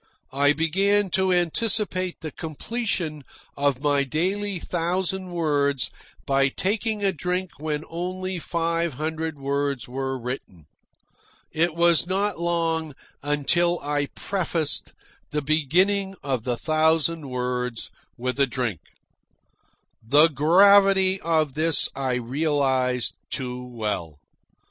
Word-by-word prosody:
I 145 +1 +4
began 195 +5 +2
to 190 0 +2
anticipate 185 +1 0
the 155 -2 -5
completion 165 - -3 0.3
of 140 -1 0
my 145 -1 +3
daily 190 +8 -1
thousand 180 +2 -2
words 145 -7 0 0.3
by 135 0 +3
taking 210 - -1
a 195 - +3
drink 180 +3 -2
when 150 0 -2
only 185 +2 -4
five 165 -2 -1
hundred 160 +1 -3
words 140 -2 -2
were 135 +1 -3
written. 120 - -7 0.9
It 165 +1 +1
was 170 -1 +3
not 195 0 0
long 165 -3 -1 0.3
until 160 +5 +2
I 145 0 -1
prefaced 170 -5 -1 0.4
the 150 0 -2
beginning 185 +7 +2
of 130 -5 -2
the 120 -2 -1
thousand 160 0 +1
words 125 -1 -3 0.3
with 130 +3 -3
a 140 - +4
drink. 120 - -2 1.2
The 145 +8 +5
gravity 190 +5 +5
of 155 -4 +1
this 160 +1 +2
I 135 -2 -1
realised 130 -1 0 0.2
too 125 -1 -4
well. 105 - -4
155 Hz, 110 wpm, -24 LUFS, 135-180 Hz, 1.2 s, The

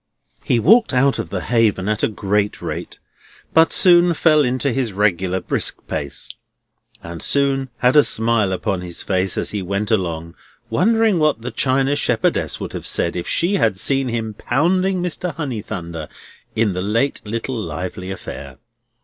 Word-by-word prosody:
He 120 - +2
walked 220 - +4
out 135 0 +3
of 100 -7 -4
the 95 0 -3
Haven 105 -2 +1
at 110 0 0
a - - +3
great 105 -1 -1
rate, - - -6 0.6
but 160 0 +5
soon 175 -1 +5
fell 155 -1 +4
into 130 +2 0
his 125 -5 -1
regular 95 -2 +1
brisk - - -2
pace, 70 -2 -4 0.8
and 85 -1 -7
soon 135 -1 0
had 125 +1 +2
a 150 - +8
smile 110 -3 +1
upon 95 0 -2
his 90 -1 -5
face 95 -1 -1
as - - -2
he 105 - -3
went 100 +3 -2
along, 85 -5 -1 0.4
wondering 220 - +3
what 150 -7 +1
the 125 - -4
china 135 +1 +1
shepherdess 145 - 0
would - - -6
have - - -5
said 85 - 0
if 90 - -4
she 190 +4 +1
had 110 - +1
seen 135 +5 0
him 115 -2 -3
pounding 180 - +1
Mr. 180 -2 -3
Honeythunder 95 - -5 0.5
in 110 -3 +1
the 90 - -3
late 115 +8 0
little 115 +4 -4
lively 90 -2 -5
affair. 70 -8 -8
115 Hz, 165 wpm, -20 LUFS, 95-140 Hz, 0.8 s, a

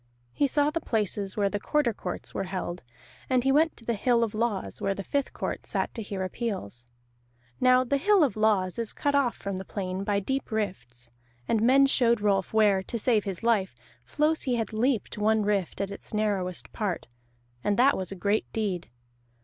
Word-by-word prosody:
He 285 - +2
saw 290 +2 +2
the 330 +1 -2
places 205 -3 -2
where 200 -1 +3
the 205 +1 -2
Quarter 280 +1 +1
Courts 180 -3 -6
were - - -2
held, 180 -1 -4 0.5
and 255 -2 +3
he 270 - +3
went 310 +3 +3
to 230 - -13
the 235 - 0
Hill 235 +2 +2
of 225 -2 -2
Laws, 215 -3 -2
where 195 0 0
the 195 - -5
Fifth 280 +6 -1
Court - - -4
sat - - -1
to 230 - -5
hear 200 -2 -4
appeals. 185 - -4 0.7
Now 255 0 +5
the 280 +3 +1
Hill 395 +3 +4
of 265 -9 +1
Laws 210 -3 +1
is 230 -2 -1
cut 285 - 0
off 275 -4 +2
from 200 -1 -4
the 190 - -5
plain 190 -1 -4
by 200 0 +1
deep 265 +7 -2
rifts, 150 - -4 0.4
and 225 - +2
men 265 +4 +6
showed 235 -4 +3
Rolf 200 -2 +1
where, 210 -3 +4
to 235 - -4
save 220 -2 +2
his 195 +1 -4
life, 210 - +1 0.3
Flosi 300 - 0
had 225 -2 -2
leaped 225 -2 0
one 215 +1 +3
rift 200 -4 -1
at 200 0 -2
its 200 - -7
narrowest 195 -4 -1
part, 200 -7 -2 0.6
and 205 - +1
that 260 +3 +5
was 185 -1 -4
a - - -4
great 200 +3 0
deed. 195 -6 -2
215 Hz, 200 wpm, -27 LUFS, 195-245 Hz, 0.7 s, men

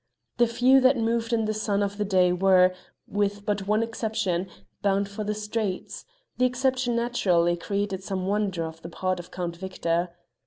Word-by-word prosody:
The 240 -1 +4
few 255 +3 +4
that 260 +1 +5
moved 230 0 0
in 225 -2 +1
the 215 - 0
sun 205 -1 0
of 200 +1 -3
the 210 - +1
day 185 -2 +3
were, 185 0 +4 0.3
with 205 0 -1
but 205 -2 -1
one 215 +2 +2
exception, 220 -5 -2 0.3
bound 200 0 +1
for 200 +2 -5
the 210 0 -2
streets; 210 -2 -4 0.3
the 255 - +4
exception 255 -1 0
naturally 185 -8 +2
created 200 +2 -2
some 190 -1 -3
wonder 195 -3 0
on 160 0 -5
the 170 - -8
part 185 +1 -2
of 175 - -9
Count 175 -2 -4
Victor. 175 -2 -1
205 Hz, 180 wpm, -26 LUFS, 185-225 Hz, 0.3 s, that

